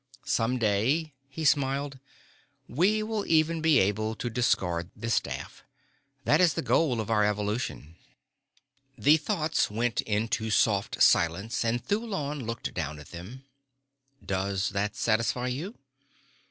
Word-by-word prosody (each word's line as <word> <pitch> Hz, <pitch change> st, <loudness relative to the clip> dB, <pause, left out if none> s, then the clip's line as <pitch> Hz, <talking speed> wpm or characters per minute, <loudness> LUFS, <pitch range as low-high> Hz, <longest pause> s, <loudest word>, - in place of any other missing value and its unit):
Some 125 Hz, +2 st, +1 dB
day," 125 Hz, +9 st, +1 dB, 0.2 s
he 155 Hz, +3 st, -5 dB
smiled, 140 Hz, -1 st, +1 dB, 0.7 s
"we 195 Hz, -, +2 dB
will 215 Hz, -1 st, -2 dB
even 160 Hz, 0 st, +2 dB
be 160 Hz, -2 st, +4 dB
able 110 Hz, +2 st, +1 dB
to 120 Hz, +1 st, -4 dB
discard 90 Hz, -7 st, 0 dB
the 115 Hz, -, -4 dB
staff. -, -, -3 dB, 0.6 s
That -, -, +4 dB
is 175 Hz, -3 st, +4 dB
the 165 Hz, -, -2 dB
goal 130 Hz, -8 st, +2 dB
of 110 Hz, 0 st, -3 dB
our 105 Hz, -1 st, +3 dB
evolution." 105 Hz, -, -2 dB, 1.0 s
The 145 Hz, +8 st, +5 dB
thoughts 160 Hz, -1 st, 0 dB
went 115 Hz, +2 st, 0 dB
into 110 Hz, +1 st, -1 dB
soft 100 Hz, -2 st, +2 dB
silence 95 Hz, +10 st, +2 dB
and 115 Hz, +1 st, -1 dB
Thulon 170 Hz, -, -2 dB
looked 115 Hz, -1 st, -4 dB
down 75 Hz, +1 st, -3 dB
at 75 Hz, -2 st, -13 dB
them. 105 Hz, +11 st, -10 dB, 0.8 s
"Does 95 Hz, 0 st, -1 dB
that 100 Hz, +1 st, -2 dB
satisfy 115 Hz, +3 st, 0 dB
you?" 160 Hz, -, -5 dB
115 Hz, 130 wpm, -28 LUFS, 105-150 Hz, 1.0 s, The